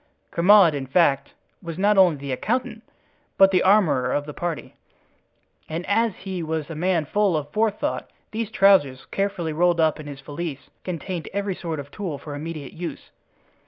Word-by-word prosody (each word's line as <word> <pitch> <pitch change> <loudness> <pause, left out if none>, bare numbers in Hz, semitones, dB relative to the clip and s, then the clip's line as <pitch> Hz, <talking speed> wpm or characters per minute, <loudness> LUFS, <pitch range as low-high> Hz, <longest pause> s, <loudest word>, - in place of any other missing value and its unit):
Grimaud, 180 -1 +6
in 135 -2 -4
fact, 140 -2 +2 0.3
was 170 -3 -7
not 205 +2 +3
only 185 -5 +5
the 140 -1 -6
accountant, 225 - -2 0.6
but 195 0 +7
the 185 -2 +3
armorer 170 -11 +3
of 145 - -1
the 150 - -7
party; 175 -1 -4 1.0
and 165 +3 -4
as 225 0 +1
he 190 -2 -5
was 160 -1 -3
a - - -5
man 170 0 +1
full 200 -1 +1
of 145 -1 -5
forethought, 215 +1 -1 0.2
these 220 -1 -3
trousers, 190 -12 +3
carefully 195 -5 -2
rolled 175 +1 +2
up 160 -1 +2
in 150 - -8
his 140 -1 -8
valise, 145 0 -6
contained 180 -1 -5
every 200 -1 -1
sort 165 -4 -5
of 140 0 -8
tool 180 -8 -4
for 145 +1 -8
immediate 150 -1 -6
use. 165 -3 -7
170 Hz, 170 wpm, -23 LUFS, 150-195 Hz, 1.0 s, but